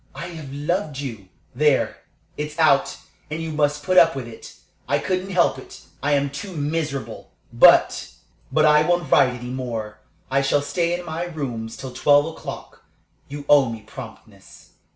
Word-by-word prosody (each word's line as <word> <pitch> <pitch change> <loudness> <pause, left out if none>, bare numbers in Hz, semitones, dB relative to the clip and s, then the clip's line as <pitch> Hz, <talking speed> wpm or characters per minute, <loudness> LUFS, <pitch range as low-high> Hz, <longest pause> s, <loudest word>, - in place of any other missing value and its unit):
I 170 - -6
have 155 -5 -9
loved 150 +2 -2
you. 115 -9 -6 0.3
"There, 145 +1 +2 0.4
it's 150 +1 -5
out, 155 -4 +3 0.3
and 155 +1 -4
you 160 -1 -4
must 150 -1 0
put 185 +4 +5
up 165 -3 +5
with 130 -3 -5
it. 115 - -12 0.3
I - - +2
couldn't 185 +1 -2
help 175 -7 +2
it. - - -13 0.2
I 145 +2 +1
am 140 -1 +1
too 185 +6 -7
miserable. 150 -1 -3 0.2
"But - - +5 0.4
"But 155 - +3
I 150 0 +6
won't 175 -2 0
write 125 -1 +4
any 125 +1 -7
more. 115 -5 -5 0.3
I 135 +1 +3
shall 140 +1 +1
stay 170 +3 0
in 180 - -9
my 165 +1 -4
rooms 125 -9 -5
till 130 -2 -8
twelve 145 0 +4
o'clock. 160 - -8 0.5
You 145 0 -7
owe 140 -4 +5
me 115 -1 -6
promptness." 110 +1 -13
145 Hz, 170 wpm, -22 LUFS, 135-165 Hz, 0.5 s, I